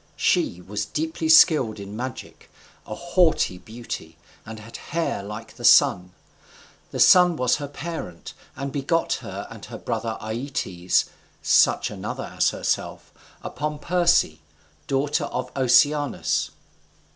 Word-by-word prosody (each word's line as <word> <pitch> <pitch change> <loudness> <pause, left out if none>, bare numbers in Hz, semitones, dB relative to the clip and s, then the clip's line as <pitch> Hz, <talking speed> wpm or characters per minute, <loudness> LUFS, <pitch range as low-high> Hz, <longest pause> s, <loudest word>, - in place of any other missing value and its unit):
She 90 - +1
was 100 +3 -4
deeply 160 +1 -3
skilled 150 - +5
in 100 +1 -8
magic, 125 +2 -7 0.4
a 110 - -5
haughty 175 - +1
beauty, 110 -8 -8 0.3
and 110 0 -8
had 110 +2 -10
hair 165 -9 -3
like 105 +3 -9
the - - -11
Sun. 90 0 +5 0.8
The - - -6
Sun 180 -2 +6
was 125 -4 +1
her 145 -1 -5
parent, 145 - -7 0.2
and 140 0 -5
begot 145 +4 0
her - - -7
and - - -11
her - - -8
brother 115 -1 -3
Aeaetes 110 -6 -1 0.4
(such - - +3
another - - -6
as - - +3
herself) - - -3 0.3
upon 150 0 -4
Perse, 170 - +2 0.5
daughter 140 +1 0
to 125 0 -5
Oceanus. 145 +2 +2
130 Hz, 125 wpm, -23 LUFS, 110-155 Hz, 0.8 s, Sun